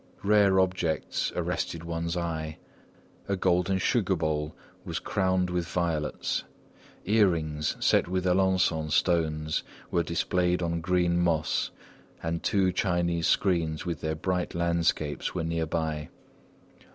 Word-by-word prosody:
Rare 100 -2 +4
objects 90 -4 0
arrested 85 -1 -2
one's 85 +1 -3
eye. 80 -2 -3 0.7
A 100 - +2
golden 90 0 +2
sugar 100 -1 +1
bowl 75 -2 -2 0.3
was - - -4
crowned 95 -2 0
with 90 -1 -1
violets, 85 -3 -1 0.6
earrings 85 -8 +1
set - - +3
with 95 +1 -1
Alençon 90 -4 +2
stones 80 -1 +1 0.3
were 85 - +2
displayed 90 +1 0
on 85 0 -1
green 90 0 +2
moss, 80 -3 +1 0.5
and 85 0 -2
two 95 -2 +2
Chinese 85 -2 0
screens 85 -5 +1
with 85 -3 -3
their 80 0 -1
bright 90 +2 -2
landscapes 85 -3 0
were 85 - -1
near 80 0 -1
by. 80 -2 -2
85 Hz, 120 wpm, -28 LUFS, 80-90 Hz, 0.7 s, Rare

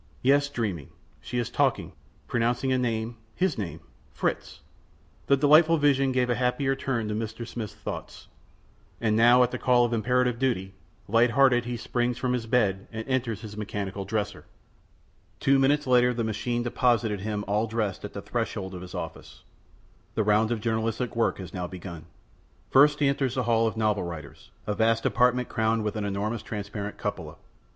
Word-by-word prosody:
Yes, 140 +2 +4
dreaming. 105 - -3 0.3
She 125 - -5
is 120 -2 -1
talking, - - +1 0.4
pronouncing 120 +2 0
a 130 - +3
name 115 -1 -2 0.2
his 185 -4 +1
name 85 -6 -5 0.3
Fritz! - - -3 0.7
The 140 - +5
delightful 155 +4 +6
vision 135 -2 +3
gave 125 -1 +1
a 125 - +2
happier 135 +2 +1
turn 125 -5 -2
to 105 - -2
Mr. 110 +2 -4
Smith's 110 -4 -6
thoughts. - - -7 0.7
And 110 -2 +1
now, 120 +3 +6
at 125 - 0
the - - -4
call 125 -1 +4
of 120 - -2
imperative 125 +1 +1
duty, 95 -8 -1 0.3
light 115 +3 +4
hearted 125 -1 +4
he 120 0 -3
springs 120 +1 -1
from 125 0 -1
his 120 -2 -2
bed 105 -5 +1
and 110 0 -6
enters 125 -6 -1
his 105 -2 -8
mechanical 100 -2 -4
dresser. 105 +1 -3 0.9
Two 135 0 +3
minutes 145 +2 +3
later 125 -1 +4
the 115 - -1
machine 120 +2 -2
deposited 120 -4 +1
him 105 +1 -3
all 105 +2 +1
dressed 110 -4 -2
at - - -7
the - - -6
threshold 95 0 -3
of 90 - -7
his 90 - -9
office. - - -8 0.7
The 110 - +2
round 105 +1 +3
of 115 -3 -1
journalistic 115 +2 -1
work 115 - +1
was 95 -2 -8
now 90 -1 -3
begun. 85 -3 -8 0.7
First 145 +2 +5
he 145 - +4
enters 135 -2 0
the 130 - 0
hall 115 -1 +2
of 110 - -3
the - - -5
novel 105 -2 +1
writers, 80 -5 -8 0.2
a 105 - -1
vast 115 +2 +1
apartment 125 0 +2
crowned 110 0 0
with 105 0 -2
an 105 -1 -2
enormous 100 +3 -2
transparent 105 -1 -5
cupola. - - -4
115 Hz, 180 wpm, -27 LUFS, 105-125 Hz, 0.9 s, delightful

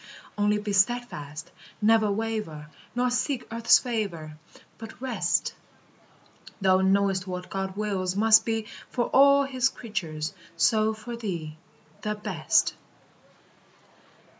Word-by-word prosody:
Only 210 0 +2
be 210 -1 -3
steadfast; 190 -8 -1 0.3
never 220 -1 +4
waver, 200 -9 -4 0.2
Nor 250 0 +1
seek 255 +1 -1
earth's 230 0 +5
favor, 195 - -4 0.4
But 225 0 -10
rest: 260 -1 0 1.1
Thou 190 -1 +3
knowest 190 0 +2
what 180 0 -6
God 190 0 -4
wills 190 -3 -1
must 220 +1 +6
be 225 -1 -2 0.2
For 240 -2 -1
all 280 +1 +6
his 265 -1 +1
creatures, 170 -12 -5 0.2
so 215 +6 +3
for 235 +2 -7
thee, 170 -9 -5 0.5
The 210 0 -2
best. 210 - +1
210 Hz, 115 wpm, -26 LUFS, 185-230 Hz, 1.1 s, must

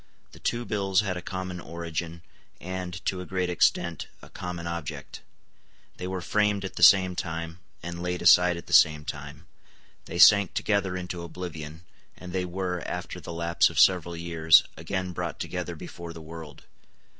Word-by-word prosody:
The - - -15
two 120 0 -2
bills 100 -3 +1
had 100 -3 -2
a 90 - -5
common 95 -1 -5
origin, 85 0 -5 0.4
and, 90 -1 -6
to 95 -1 -1
a - - -7
great 90 -1 -1
extent, 85 -1 +1 0.2
a - - -14
common 90 -1 -6
object. 85 -3 -6 0.8
They 90 - -5
were 95 -1 -3
framed 105 0 +1
at 95 - -7
the - - -6
same 95 -2 +7
time, 85 -1 -5 0.2
and 85 0 -6
laid 90 0 -3
aside 90 -1 +6
at 85 - -9
the - - -7
same 75 -1 +5
time: 70 +3 -7 0.6
they 85 - -6
sank 100 +1 +7
together 100 -3 0
into 90 -1 -5
oblivion; 85 -2 -7 0.3
and 90 -1 -9
they 95 -1 -1
were, 90 0 -3
after - - -5
the - - -8
lapse 85 0 +2
of - - -2
several 85 -2 +4
years, 80 -1 +5
again 90 +2 -3
brought 85 -3 -4
together - - -4
before 85 -1 -9
the 85 - -10
world. 80 -2 -10
90 Hz, 170 wpm, -27 LUFS, 85-95 Hz, 0.8 s, same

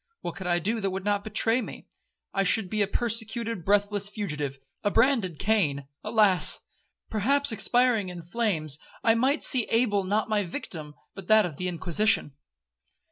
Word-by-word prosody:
—what 175 - -5
could 190 -1 -6
I 175 -1 +2
do 215 +7 0
that 195 - 0
would 190 +1 -5
not 205 -1 0
betray 225 +3 +3
me? - - -9 0.5
I 195 - +1
should 195 0 +2
be 215 - 0
a 200 - +2
persecuted, 230 -3 -2
breathless 205 +1 +1
fugitive,—a 145 -6 -4
branded 225 - +2
Cain. 150 -9 0 0.2
Alas!—perhaps 215 +4 0
expiring 235 -2 +2
in 175 -1 -8
flames, 165 - -1 0.2
I 225 - +5
might 265 +6 +1
see 250 -4 +4
Abel 225 -4 +1
not 205 +3 0
my 215 -2 0
victim, 165 - -6 0.2
but 195 -2 -11
that 215 -1 +5
of 155 -5 -6
the 180 - -3
Inquisition.' 180 0 +1
205 Hz, 155 wpm, -26 LUFS, 180-225 Hz, 0.5 s, I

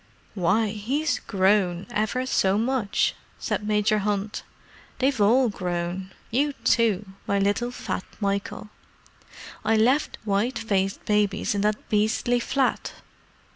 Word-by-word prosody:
"Why, 205 +3 +2
he's 255 +9 -1
grown—ever 205 +4 +1
so 195 -6 +2
much!" 230 -2 +1 0.2
said 210 - -3
Major 210 0 +2
Hunt. 205 +1 -2 0.6
"They've 265 -3 +1
all 245 +5 +5
grown; 180 0 -3 0.2
you 285 +5 +1
too, 220 -7 +2 0.2
my 200 - +1
little 205 +5 +1
fat 245 -6 -4
Michael. 200 +1 -2 0.9
I 220 +1 +3
left 255 +7 +2
white 215 +5 0
faced 195 -3 -1
babies 210 -1 +1
in 200 - -1
that 210 +1 -1
beastly 220 +3 +1
flat. 260 +2 0
210 Hz, 115 wpm, -25 LUFS, 200-240 Hz, 0.9 s, all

